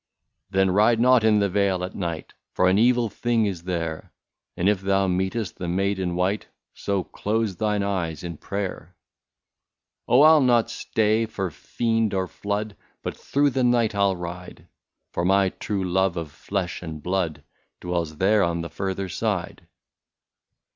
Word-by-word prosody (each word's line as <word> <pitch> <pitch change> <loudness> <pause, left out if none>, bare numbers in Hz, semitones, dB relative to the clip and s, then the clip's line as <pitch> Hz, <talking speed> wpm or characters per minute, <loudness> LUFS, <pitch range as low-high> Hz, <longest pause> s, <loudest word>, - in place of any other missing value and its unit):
*^ 95 0 +4
Oh! - - +1
ride 110 +4 +4
not 125 -1 +5
in 110 -1 +4
the 100 -1 +3
vale 95 -1 +1
at 90 - -5
night, 85 -4 -4 0.2
For 90 - +3
an 95 +2 +4
evil 120 0 +3
thing 115 +1 0
is 90 -4 -4
there; 85 -3 -3 0.5
And 90 - +1
if 100 -2 +2
thou 95 0 +2
meetest 95 +3 -1
the 90 - -4
maid 95 +3 0
in 90 -2 -2
white, 95 +4 0 0.3
So 100 -2 -2
close 105 0 -2
thine 105 -1 0
eyes 90 -6 -2
in 85 -3 -6
prayer/* 100 +2 -5 0.6
" - - -62
Oh! 125 - +5
I 155 +1 +8
'11 150 -5 +5
not 120 -2 +3
stay 110 +1 +1
for 95 -5 -3
fiend 115 +4 -1
or 95 -1 0
flood, 100 +2 -4 0.3
But - - -4
through 145 0 +1
the 130 0 0
night 120 -3 +3
I 100 - -3
'11 95 -2 +2
ride. 90 +1 -8 0.4
For 85 - -2
my 95 +1 +3
true 100 +1 -3
love 95 0 +1
of 80 -3 -4
flesh 95 +1 -4
and 80 -3 -7
blood 85 -6 -1 0.4
Dwells 85 -3 -3
there 100 +4 +3
on 85 -2 0
the 85 -2 -6
farther 95 +2 -3
side." 90 - -3
95 Hz, 175 wpm, -24 LUFS, 90-110 Hz, 0.6 s, I